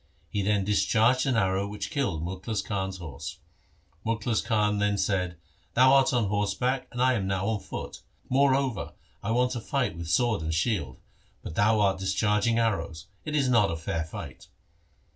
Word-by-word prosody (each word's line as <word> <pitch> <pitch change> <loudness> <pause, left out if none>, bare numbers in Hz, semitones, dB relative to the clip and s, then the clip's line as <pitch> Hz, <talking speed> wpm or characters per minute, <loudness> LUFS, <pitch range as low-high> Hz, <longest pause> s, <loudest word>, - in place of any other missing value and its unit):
He 105 - -1
then 100 0 +1
discharged 110 +6 +3
an 130 - +2
arrow 95 -2 +1
which 105 0 -5
killed 85 - -1
Mukhlis 95 +4 -3
Khan's 95 -2 -2
horse. 80 -8 -7 0.7
Mukhlis 115 0 0
Khan 105 -3 +1
then 105 0 +1
said, 90 -3 0 0.2
' - - -37
Thou 130 +2 +6
art 135 +3 +5
on 120 -3 +2
horseback 115 +6 0
and 125 - -6
I 130 +1 +4
am 100 -6 -1
now 95 -1 -1
on 110 -2 0
foot. - - -7 0.3
Moreover, 135 -3 +1 0.3
I 105 - -4
want 125 +2 +2
to 120 -2 -3
fight 130 - -1
with 85 -1 -6
sword 110 +3 +2
and 80 0 -2
shield, 85 - -1 0.5
but - - -6
thou 110 +4 +3
art 95 -1 +2
discharging 105 +4 +1
arrows. 85 -8 -1 0.2
It 150 -1 -3
is 140 -3 +2
not 115 -5 +4
a 80 - -2
fair 80 0 -2
fight.' 80 - -9
105 Hz, 180 wpm, -27 LUFS, 95-120 Hz, 0.7 s, Thou